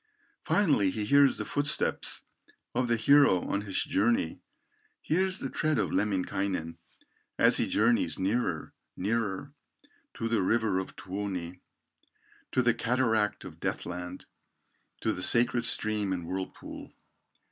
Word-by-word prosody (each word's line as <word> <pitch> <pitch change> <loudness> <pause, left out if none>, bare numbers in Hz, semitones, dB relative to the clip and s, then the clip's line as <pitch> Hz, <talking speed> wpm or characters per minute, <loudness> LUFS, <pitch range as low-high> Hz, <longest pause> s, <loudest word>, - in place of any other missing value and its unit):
Finally 145 - +2
he 105 +2 -3
hears 140 +4 +5
the - - -4
footsteps 145 +1 -1 0.5
Of 125 +1 0
the 120 - +2
hero 130 -5 +5
on 100 - -1
his 100 -3 -1
journey, 105 -5 0 0.6
Hears 185 +3 0
the - - -4
tread 155 -2 0
of 110 - 0
Lemminkainen, 95 -4 -1 0.6
As - - +5
he - - 0
journeys 115 +2 +2
nearer, 95 -4 -1 0.2
nearer, 110 +5 -2 0.6
To 115 - -3
the 115 -3 +1
river 105 -1 +1
of 95 - -6
Tuoni, 95 -2 -5 0.9
To 130 - +2
the 120 0 +4
cataract 115 -3 0
of - - -10
death - - -3
land, 90 +1 -7 0.8
To - - 0
the 90 - -6
sacred 120 +3 +3
stream 105 -4 +2
and 85 -2 -4
whirlpool. 95 +2 -6
105 Hz, 130 wpm, -29 LUFS, 95-120 Hz, 0.9 s, hears